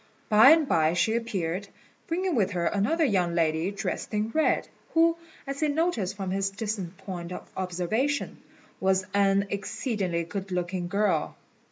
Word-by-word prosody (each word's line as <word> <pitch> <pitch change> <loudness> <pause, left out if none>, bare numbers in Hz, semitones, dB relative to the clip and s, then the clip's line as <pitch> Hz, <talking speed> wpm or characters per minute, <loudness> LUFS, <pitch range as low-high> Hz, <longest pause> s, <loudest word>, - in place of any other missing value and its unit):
By 220 +4 +8
and 320 -1 +6
by 160 -6 +3
she 200 +5 +2
appeared, 200 -5 -2 0.4
bringing 365 +2 0
with 205 -6 +1
her 175 -1 -1
another 215 - +2
young 180 -8 +1
lady 160 +1 +1
dressed 200 +2 -4
in 215 +2 0
red, 315 +3 +2 0.3
who, 330 0 +5 0.3
as 275 0 -5
he 310 - +2
noticed 285 - 0
from 190 -2 -3
his 195 +1 0
distant 195 -3 -4
point 175 -2 -7
of - - -7
observation, 190 +11 -1 0.4
was 190 0 +2
an 200 0 +3
exceedingly 195 -3 -2
good 190 +3 -6
looking 180 0 -2
girl. 205 +3 0
195 Hz, 155 wpm, -27 LUFS, 180-230 Hz, 0.4 s, By